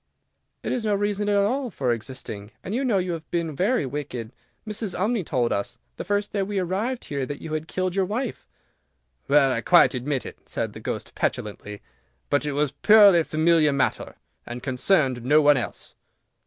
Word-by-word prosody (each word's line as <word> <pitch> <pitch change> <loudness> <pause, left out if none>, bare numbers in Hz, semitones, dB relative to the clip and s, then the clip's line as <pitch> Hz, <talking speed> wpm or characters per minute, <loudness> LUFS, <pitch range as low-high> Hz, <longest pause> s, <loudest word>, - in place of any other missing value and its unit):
"It - - -2
is 245 - -1
no 210 -2 +1
reason 205 0 -1
at 205 - +2
all 250 +6 +1
for 130 - -1
existing, 110 -3 -6
and 190 - -5
you 255 +4 0
know 235 -7 +2
you 180 -1 -1
have 165 -2 -6
been 165 -3 -2
very 195 - +1
wicked. 130 -4 -5 0.4
Mrs. 215 -2 -3
Umney 210 +1 +1
told 125 -6 0
us, 100 - -3 0.2
the - - -4
first 205 0 -1
day 200 - 0
we 200 +1 -2
arrived 200 +8 -2
here, 140 -2 -3
that 145 -1 -5
you 155 - -7
had 155 +1 -3
killed 185 0 -2
your 195 -1 +2
wife." 225 +5 -4 0.8
"Well, 140 -1 +4
I - - -1
quite 170 -7 +5
admit 130 +1 -2
it," - - -11
said - - -3
the - - -9
Ghost, - - -5
petulantly, 105 0 -4 0.5
"but 145 +1 +1
it 145 - -1
was 145 -1 0
a 145 - -41
purely 205 -5 +7
family 155 0 +3
matter, 140 -1 -1 0.3
and 120 +1 -8
concerned 130 -1 +1
no 145 +5 +5
one 145 -1 +5
else." 125 - -5
160 Hz, 195 wpm, -24 LUFS, 135-205 Hz, 0.8 s, purely